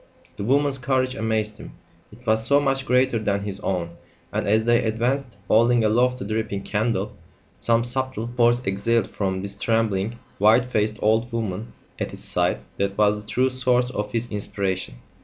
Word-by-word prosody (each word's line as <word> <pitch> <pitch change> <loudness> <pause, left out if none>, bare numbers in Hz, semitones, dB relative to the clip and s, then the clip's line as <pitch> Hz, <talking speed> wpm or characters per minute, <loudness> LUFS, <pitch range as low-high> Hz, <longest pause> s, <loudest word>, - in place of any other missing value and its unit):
The - - -5
woman's 140 +3 +2
courage 130 0 0
amazed 110 -3 -1
him; - - -10 0.4
it - - -17
was 110 0 +2
so 140 +5 +4
much 135 -2 0
greater 125 -2 +3
than 100 -2 -1
his 100 -1 -5
own; 85 -4 -3 0.4
and, - - -1
as 110 +2 +3
they 120 0 +3
advanced, 120 +2 -1
holding 115 +1 +4
aloft 125 +4 +3
the 110 - -6
dripping 110 -2 -2
candle, 105 -1 -1 0.4
some 115 0 +3
subtle 130 -2 -1
force 120 0 +3
exhaled 100 +3 0
from 95 -2 -2
this 100 0 -5
trembling, 110 -1 0 0.2
white 110 +5 +5
faced 110 -3 0
old 110 +3 +2
woman 110 -2 -4 0.3
at - - -2
his - - -8
side - - 0 0.2
that 100 0 -1
was 105 0 +4
the 105 0 -11
true 130 +3 +2
source 125 -1 +1
of 105 -2 -3
his 120 +1 -2
inspiration. 100 - -3
110 Hz, 175 wpm, -23 LUFS, 105-125 Hz, 0.4 s, white